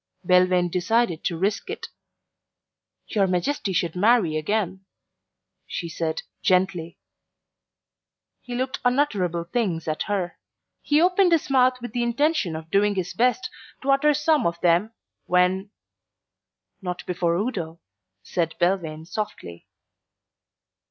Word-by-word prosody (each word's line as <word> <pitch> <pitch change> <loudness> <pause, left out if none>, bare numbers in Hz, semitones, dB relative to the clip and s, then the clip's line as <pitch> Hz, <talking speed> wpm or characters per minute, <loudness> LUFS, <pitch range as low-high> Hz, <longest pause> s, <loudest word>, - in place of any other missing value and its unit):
Belvane 180 -1 +4
decided 185 -1 +1
to 170 - -1
risk 200 - -1
it. 435 - -5 1.2
"Your 200 -4 +2
Majesty 190 +4 -1
should 170 -2 -1
marry 200 -4 +3
again," 190 +3 -1 0.8
she 170 - -4
said 160 -1 -3 0.2
gently. 180 -3 +1 1.4
He 245 -1 -6
looked 260 +2 -2
unutterable 210 - +1
things 170 -4 -2
at 155 0 -2
her. 190 -4 -2 0.4
He 295 +1 +2
opened 360 +2 +4
his 315 -4 +1
mouth 255 -1 +4
with 240 - -5
the 245 - -1
intention 240 - +1
of 160 +1 -8
doing 205 +1 +3
his 180 -2 -3
best 250 +10 +1 0.3
to 275 - +2
utter 290 +2 +4
some 300 - +2
of 170 0 -3
them, 175 +5 +3 0.4
when 180 +2 +2 1.1
"Not 180 -1 -5
before 175 -1 0
Udo," 175 -6 -3 0.4
said 165 - -2
Belvane 170 -4 0
softly. 170 - -6
190 Hz, 120 wpm, -24 LUFS, 170-245 Hz, 1.4 s, Belvane